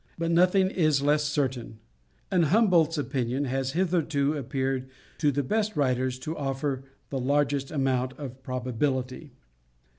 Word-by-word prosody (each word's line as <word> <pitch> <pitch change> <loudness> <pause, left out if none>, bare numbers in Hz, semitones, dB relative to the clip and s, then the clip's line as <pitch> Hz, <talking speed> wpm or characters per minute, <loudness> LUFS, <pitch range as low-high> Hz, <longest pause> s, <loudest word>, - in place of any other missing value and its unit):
But 165 0 -1
nothing 185 +2 +4
is 155 -5 +2
less 150 +1 +3
certain, 130 -6 -2 0.5
and 180 -3 +3
Humboldt's 170 -4 +3
opinion 135 -1 -1
has 135 0 -2
hitherto 160 -5 +1
appeared 135 -1 -2 0.3
to 150 -3 +3
the 145 +1 -1
best 215 +8 0
writers 130 -3 +1
to 155 +5 -4
offer 135 -1 -2 0.3
the 135 - -1
largest 140 +1 +1
amount 130 -3 0
of 130 -3 -8
probability. 130 +2 -2
140 Hz, 130 wpm, -27 LUFS, 130-155 Hz, 0.5 s, nothing